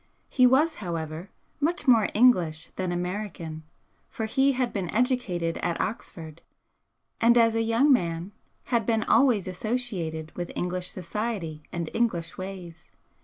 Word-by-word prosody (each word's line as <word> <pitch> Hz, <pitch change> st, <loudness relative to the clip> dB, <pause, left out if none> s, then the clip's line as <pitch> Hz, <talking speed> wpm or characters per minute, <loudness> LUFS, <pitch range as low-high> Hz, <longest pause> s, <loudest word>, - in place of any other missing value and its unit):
He 255 Hz, -2 st, +5 dB
was, 295 Hz, +6 st, +4 dB
however, 165 Hz, 0 st, -4 dB, 0.3 s
much 310 Hz, +1 st, -1 dB
more 230 Hz, -5 st, +5 dB
English 180 Hz, -10 st, +3 dB
than 185 Hz, -1 st, -2 dB
American, 175 Hz, -3 st, -4 dB, 0.5 s
for 220 Hz, -, -4 dB
he 270 Hz, +5 st, +2 dB
had 250 Hz, -1 st, -1 dB
been 190 Hz, -5 st, -2 dB
educated 210 Hz, -8 st, 0 dB
at 170 Hz, -1 st, -2 dB
Oxford, 165 Hz, -7 st, -5 dB, 0.8 s
and 235 Hz, +1 st, +5 dB
as 230 Hz, -1 st, +5 dB
a 225 Hz, -, +1 dB
young 230 Hz, +6 st, +4 dB
man 170 Hz, -4 st, -1 dB, 0.4 s
had 235 Hz, -1 st, +2 dB
been 225 Hz, -2 st, +2 dB
always 235 Hz, -9 st, +3 dB
associated 185 Hz, -6 st, -3 dB
with 175 Hz, -1 st, -4 dB
English 180 Hz, 0 st, -3 dB
society 185 Hz, -4 st, -4 dB
and 170 Hz, -1 st, -3 dB
English 175 Hz, -8 st, -1 dB
ways. 185 Hz, -3 st, -8 dB
195 Hz, 135 wpm, -26 LUFS, 170-235 Hz, 0.8 s, He